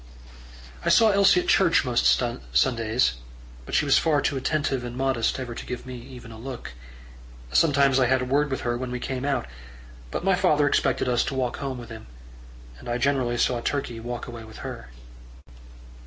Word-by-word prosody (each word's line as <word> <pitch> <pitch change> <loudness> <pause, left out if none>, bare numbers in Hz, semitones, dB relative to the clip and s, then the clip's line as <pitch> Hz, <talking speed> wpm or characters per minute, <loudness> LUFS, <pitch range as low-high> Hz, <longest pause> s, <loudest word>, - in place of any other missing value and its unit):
I - - +1
saw 225 -2 +6
Elsie 195 -2 +5
at - - -8
church - - +4
most - - +2 0.4
Sundays; 115 - +2 0.5
but - - -3
she - - +3
was - - +5
far 155 -3 +2
too 140 - -1
attentive 135 -1 -1
and 120 0 -6
modest 130 -2 0
ever 125 -2 -5
to - - -7
give 125 0 -6
me 130 - -7
even 125 -1 -11
a 110 - -11
look. 125 - -7 0.8
Sometimes 140 - +4
I 130 - +3
had 130 +1 +3
a 125 - -2
word 145 +3 +1
with 130 - -3
her 120 -1 -1
when 130 -1 -4
we 125 0 -4
came 130 0 -4
out, 135 -4 0 0.6
but - - -4
my 195 +1 +3
father 155 -6 +3
expected 140 - +1
us 120 -1 +2
to 135 - -3
walk 125 -2 -1
home 135 -2 -4
with 120 -1 -10
him; 110 - -10 0.7
and - - -9
I 120 - 0
generally 125 -2 0
saw 120 0 +1
Turkey 120 -3 -3
walk 120 +1 -5
away 120 -2 -9
with 110 0 -11
her. - - -7
130 Hz, 195 wpm, -25 LUFS, 120-140 Hz, 0.8 s, saw